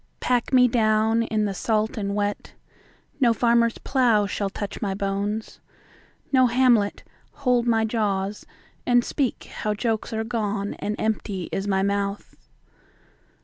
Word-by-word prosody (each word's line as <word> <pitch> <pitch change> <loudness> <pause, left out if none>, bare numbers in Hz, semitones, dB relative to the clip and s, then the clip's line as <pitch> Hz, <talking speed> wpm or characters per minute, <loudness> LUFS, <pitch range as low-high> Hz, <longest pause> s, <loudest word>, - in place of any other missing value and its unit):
Pack 245 -2 0
me 250 -1 +6
down 220 -1 +2
in 215 -2 0
the 200 - -2
salt 215 +2 0
and 200 -2 -3
wet.No 210 +4 -3
farmer's 235 -1 +2
plow 240 -6 +2
shall 200 0 -2
touch 205 0 -6
my 195 -2 -1
bones.No 205 +6 -3
Hamlet 240 -4 +2 0.3
hold 250 -4 +1
my 225 -1 +3
jaws 205 -3 -1 0.4
and 245 -1 +3
speakHow 225 -6 -3
jokes 225 -1 -1
are 220 0 -2
gone 210 -3 -2
and 210 - -2
empty 205 -4 -2
is 195 +1 -2
my 190 -1 +1
mouth. 200 0 -2
215 Hz, 125 wpm, -24 LUFS, 200-235 Hz, 0.4 s, me